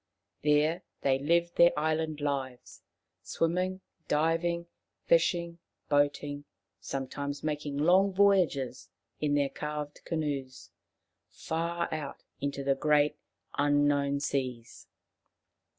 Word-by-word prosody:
There 150 Hz, +4 st, +3 dB, 0.2 s
they 135 Hz, -1 st, +2 dB
lived 170 Hz, +4 st, +1 dB
their 170 Hz, -2 st, +6 dB
island 155 Hz, 0 st, -1 dB
lives, 135 Hz, -4 st, -4 dB, 0.4 s
swimming, 180 Hz, +3 st, -1 dB, 0.3 s
diving, 165 Hz, +3 st, +1 dB, 0.4 s
fishing, 170 Hz, 0 st, +2 dB, 0.3 s
boating; 145 Hz, 0 st, +1 dB, 0.3 s
sometimes 140 Hz, +1 st, -4 dB
making 150 Hz, -2 st, -2 dB
long 185 Hz, +6 st, +4 dB
voyages 185 Hz, -10 st, +2 dB, 0.3 s
in 145 Hz, -1 st, +1 dB
their 140 Hz, -1 st, +2 dB
carved 150 Hz, 0 st, -5 dB
canoes 145 Hz, -5 st, -4 dB, 0.6 s
far 170 Hz, +1 st, -2 dB
out 150 Hz, -3 st, -5 dB, 0.2 s
into 140 Hz, 0 st, -3 dB
the 135 Hz, 0 st, +3 dB
great 150 Hz, +1 st, +2 dB, 0.4 s
unknown 145 Hz, -1 st, +2 dB
seas. 125 Hz, -5 st, -3 dB
150 Hz, 95 wpm, -30 LUFS, 140-165 Hz, 0.6 s, their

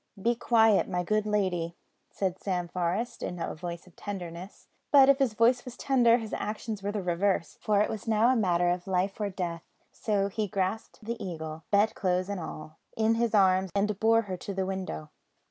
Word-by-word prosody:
"Be 235 Hz, +5 st, +2 dB
quiet, 225 Hz, -3 st, +3 dB
my 180 Hz, 0 st, -1 dB
good 215 Hz, +3 st, 0 dB
lady," 180 Hz, -5 st, 0 dB, 0.3 s
said 190 Hz, -2 st, -2 dB
Sam 180 Hz, -3 st, -1 dB
Forest 180 Hz, +7 st, -2 dB
in 180 Hz, -, -4 dB
a -, -, -3 dB
voice 170 Hz, +1 st, -7 dB
of 180 Hz, -, -20 dB
tenderness; 185 Hz, -2 st, -7 dB, 0.2 s
but 275 Hz, -2 st, +7 dB
if 275 Hz, 0 st, +5 dB
his 255 Hz, -6 st, +1 dB
voice 240 Hz, +3 st, +3 dB
was 250 Hz, -1 st, -9 dB
tender 240 Hz, -4 st, +4 dB
his 225 Hz, -3 st, -6 dB
actions 215 Hz, 0 st, -4 dB
were 200 Hz, +1 st, -2 dB
the 205 Hz, -2 st, -3 dB
reverse, 180 Hz, -1 st, 0 dB
for 210 Hz, -2 st, +2 dB
it -, -, +2 dB
was 220 Hz, +1 st, -6 dB
now 220 Hz, +2 st, +4 dB
a 260 Hz, -, +4 dB
matter 175 Hz, -5 st, +2 dB
of 180 Hz, +1 st, -3 dB
life 190 Hz, +2 st, -1 dB
or 205 Hz, -, 0 dB
death; 175 Hz, -3 st, -4 dB, 0.3 s
so 200 Hz, -3 st, 0 dB
he 210 Hz, +1 st, -2 dB
grasped 200 Hz, +5 st, -3 dB
the 235 Hz, +1 st, -4 dB
Eagle, 160 Hz, -3 st, -6 dB
bedclothes 200 Hz, -3 st, +1 dB
and 200 Hz, -2 st, -3 dB
all, 155 Hz, -1 st, -8 dB, 0.2 s
in 220 Hz, 0 st, +3 dB
his 230 Hz, -1 st, +1 dB
arms, 190 Hz, -1 st, +4 dB
and 205 Hz, 0 st, 0 dB
bore 225 Hz, +1 st, +4 dB
her 190 Hz, -3 st, -5 dB
to 195 Hz, +2 st, -6 dB
the 190 Hz, 0 st, 0 dB
window. 185 Hz, -5 st, -5 dB
200 Hz, 195 wpm, -28 LUFS, 180-220 Hz, 0.3 s, but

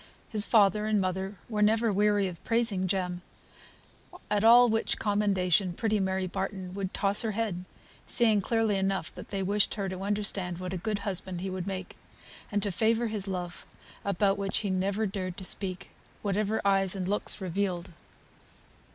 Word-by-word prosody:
His 215 Hz, -2 st, +2 dB
father 210 Hz, -1 st, +4 dB
and 215 Hz, -1 st, +2 dB
mother 190 Hz, +1 st, -2 dB
were 215 Hz, -3 st, -2 dB
never 220 Hz, +1 st, +3 dB
weary 205 Hz, 0 st, +2 dB
of 175 Hz, -3 st, -8 dB
praising 225 Hz, -5 st, +1 dB
Jem, 180 Hz, -1 st, -1 dB, 1.1 s
at 210 Hz, 0 st, +2 dB
all 240 Hz, +2 st, +8 dB
which 225 Hz, -1 st, 0 dB
commendation 195 Hz, -3 st, +1 dB
pretty 215 Hz, +3 st, 0 dB
Mary 190 Hz, -1 st, 0 dB
Barton 190 Hz, 0 st, -4 dB
would 195 Hz, -1 st, -3 dB
toss 200 Hz, +1 st, +3 dB
her 220 Hz, -2 st, -1 dB
head, 200 Hz, -5 st, -2 dB, 0.4 s
seeing 220 Hz, -4 st, +5 dB
clearly 225 Hz, -1 st, +1 dB
enough 195 Hz, 0 st, -1 dB
that -, -, -10 dB
they 195 Hz, -1 st, -2 dB
wished 200 Hz, +2 st, +2 dB
her 200 Hz, -2 st, -2 dB
to 185 Hz, 0 st, -5 dB
understand 200 Hz, -3 st, 0 dB
what 185 Hz, 0 st, -5 dB
a -, -, -2 dB
good 210 Hz, +4 st, -2 dB
husband 185 Hz, -2 st, -3 dB
he 190 Hz, 0 st, -3 dB
would 185 Hz, -1 st, -4 dB
make, 190 Hz, -2 st, -5 dB, 0.5 s
and 205 Hz, -1 st, 0 dB
to 205 Hz, -, +1 dB
favour 225 Hz, +4 st, +1 dB
his 210 Hz, -2 st, -4 dB
love, 180 Hz, -2 st, -4 dB, 0.4 s
about 200 Hz, 0 st, +1 dB
which 195 Hz, -1 st, -1 dB
he 205 Hz, -3 st, -2 dB
never 195 Hz, +3 st, 0 dB
dared 185 Hz, -3 st, -4 dB
to -, -, -6 dB
speak, 190 Hz, 0 st, -3 dB, 0.3 s
whatever 210 Hz, +1 st, 0 dB
eyes 195 Hz, -1 st, +3 dB
and 185 Hz, -2 st, -3 dB
looks 205 Hz, +2 st, +1 dB
revealed. 185 Hz, -1 st, -2 dB
195 Hz, 170 wpm, -29 LUFS, 185-210 Hz, 1.1 s, all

